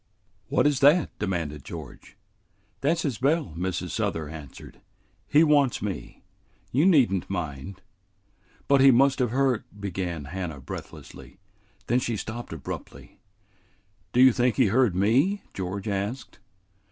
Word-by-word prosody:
"What - - +2
is 145 -3 +2
that?" 150 +4 +5
demanded 80 -8 -3
George. - - -10 0.6
"That's 160 +4 +1
his 130 -8 -2
bell," 140 - +1
Mrs. 90 0 -3
Souther 90 -9 -2
answered. 75 -4 -11 0.5
"He 150 +2 +5
wants 145 -5 +3
me. 95 -12 -6 0.5
You 145 +8 +3
need 140 - +5
n't 95 - -3
mind." 90 0 -5 0.9
"But 140 -1 +4
he 135 - +8
must 135 +2 +4
have 125 -2 +1
heard 130 -1 +1
" - - -16
began 90 -6 -4
Hannah 85 -1 -5
breathlessly. 80 - -10 0.5
Then 120 +2 +2
she 120 -3 -2
stopped 120 +4 -6
abruptly. 80 -5 -8 0.9
"Do 125 - +3
you 130 -2 +7
think 120 0 +1
he 125 -6 +3
heard 115 -3 +3
me?" 130 - +2
George 95 +2 -5
asked. 105 +5 -4
110 Hz, 140 wpm, -26 LUFS, 90-135 Hz, 0.9 s, he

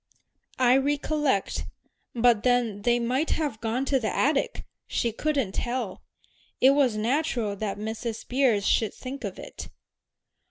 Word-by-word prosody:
"I 255 0 +5
recollect. 290 -4 0 0.5
But 235 -2 +4
then 240 -4 +1
they 240 +3 +3
might 255 +6 0
have 290 -9 -3
gone 235 +4 -1
to 270 0 +2
the 220 -3 -1
attic 285 0 0 0.2
she 235 - 0
couldn't 275 -3 -1
tell. 240 -3 -3 0.6
It 265 - +7
was 270 -6 +2
natural 235 -2 0
that 205 -1 -3
Mrs. 220 +2 -5
Beers 245 -6 +2
should 220 -3 +2
think 270 +2 -7
of - - -5
it." - - -9
245 Hz, 135 wpm, -26 LUFS, 220-275 Hz, 0.6 s, It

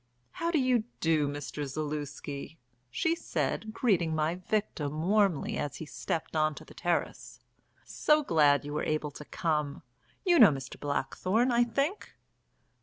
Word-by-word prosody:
How 335 - -2
do 340 - +2
you 255 -5 +2
do, 160 -3 +2
Mr. 145 +1 -4
Zaluski?" 145 +1 -5 0.3
she 325 - +1
said, 220 -8 -2
greeting 185 -9 +1
my 155 +1 +1
victim 175 -6 -2
warmly 195 -4 +2
as 145 - -3
he 160 - -6
stepped 160 +2 -4
on 155 -1 +2
to 155 - -10
the - - -14
terrace. 175 -1 -2 0.5
"So 300 0 +2
glad 145 - +4
you 145 - -5
were 150 - -1
able 155 -1 -1
to 150 - -10
come. 150 -4 -2 0.4
You 350 -3 +5
know 225 - +10
Mr. 135 -3 -5
Blackthorne, 185 - 0
I 240 0 +4
think." 280 - -2
160 Hz, 150 wpm, -30 LUFS, 150-220 Hz, 0.5 s, know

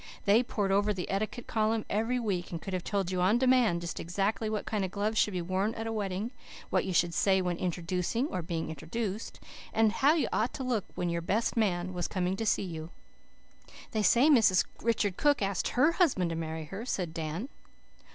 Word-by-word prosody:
They 210 +3 +5
pored 205 -5 -1
over 205 +1 +2
the 180 - -4
"etiquette 215 +4 -2
column" 220 0 0
every 225 +4 0
week, 195 -7 -2
and 170 - -4
could 195 - -7
have 180 -1 -2
told 195 -3 -1
you 180 -1 0
on 195 +6 +4
demand, 250 -8 +3
just 170 -2 -5
exactly 195 +5 -1
what 215 -1 -2
kind 210 -3 -1
of 190 - -1
gloves 210 +3 -1
should 205 - +2
be 175 - -1
worn 190 +5 -1
at 225 - -4
a 225 - -2
wedding, 205 +1 -2 0.4
what - - +2
you 190 - -2
should 175 -1 +2
say 190 +1 +3
when 180 -2 -1
introducing 180 +6 -1
or 185 - -2
being 165 -1 -3
introduced, 195 +7 -4 0.3
and 220 -1 +3
how 280 +7 +4
you 320 - +1
ought 225 +4 0
to 265 - -4
look 240 -6 0
when 175 -1 -1
your 170 0 -1
best 210 +7 0
young 185 -5 0
man 175 -1 -3
came 185 0 -1
to 225 - -3
see - - +2
you. 165 -3 -6 1.0
"They 220 - 0
say 240 +6 +5
Mrs. 225 -11 +5 0.2
Richard 210 -4 0
Cook 290 -6 +3
asked 195 -2 0
HER 290 +6 +3
husband 265 - +2
to - - -2
marry 160 -1 -4
her," 195 +8 -6
said 180 -9 -2
Dan. 165 - -4
195 Hz, 210 wpm, -30 LUFS, 180-225 Hz, 1.0 s, They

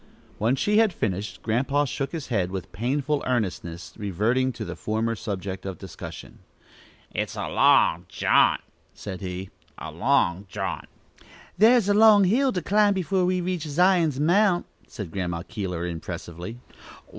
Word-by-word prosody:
When 115 +5 +2
she 210 +9 +2
had 220 -4 +3
finished, 100 - -3
Grandpa 135 +6 +1
shook 135 +1 -3
his 160 -4 -6
head 100 -7 0
with 95 -1 -6
painful 140 +6 -1
earnestness, 90 -8 -3
reverting 110 +7 0
to 110 - -6
the - - -6
former 110 +2 -1
subject 100 -3 -5
of 95 -3 -5
discussion. - - -10 0.7
"It's - - -3
a - - -3
long - - +3
jaunt!" - - +3 0.3
said 95 -3 -7
he; 95 0 -5 0.3
"a 80 - -7
long 95 - +1
jaunt!" 95 -1 -4 0.7
"Thar's 225 0 +6
a 205 - +4
long 210 -1 +7
hill 255 +8 +3
to 180 -7 -3
climb 205 +1 +3
before 185 0 +1
we 180 0 +1
reach 180 -1 -2
Zion's 165 -2 +3
mount," 175 +4 +3 0.2
said 100 -6 -7
Grandma 90 -3 -3
Keeler, 90 -5 -4
impressively. 85 +4 -6
120 Hz, 145 wpm, -25 LUFS, -, 0.7 s, long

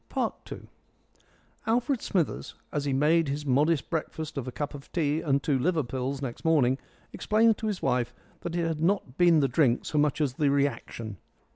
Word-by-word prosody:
II - - +1 1.3
Alfred 240 +3 +1
Smithers, 175 -6 -1 0.2
as 145 -1 -2
he 140 - 0
made 155 +4 +3
his 145 +2 -3
modest 145 +3 +2
breakfast 160 -1 -3
of 135 -3 -4
a - - -3
cup 145 +4 -4
of 140 -1 -11
tea 155 -2 0
and 140 -3 +1
two 140 -5 +1
liver 160 +3 +1
pills 130 +2 -3
next 120 -3 -5
morning, 140 -5 +3 0.3
explained 220 +1 +3
to 220 - -2
his 205 -3 -3
wife 125 -2 +1 0.3
that 175 -1 -5
it 170 -1 +1
had 160 -2 -2
not 170 -6 0
been 170 -3 +6
the 135 - +3
drink 130 -2 +2
so 150 - 0
much 150 0 +2
as 145 -5 +1
the 145 +2 +1
reaction. 120 -6 -1
150 Hz, 185 wpm, -28 LUFS, 135-165 Hz, 1.3 s, been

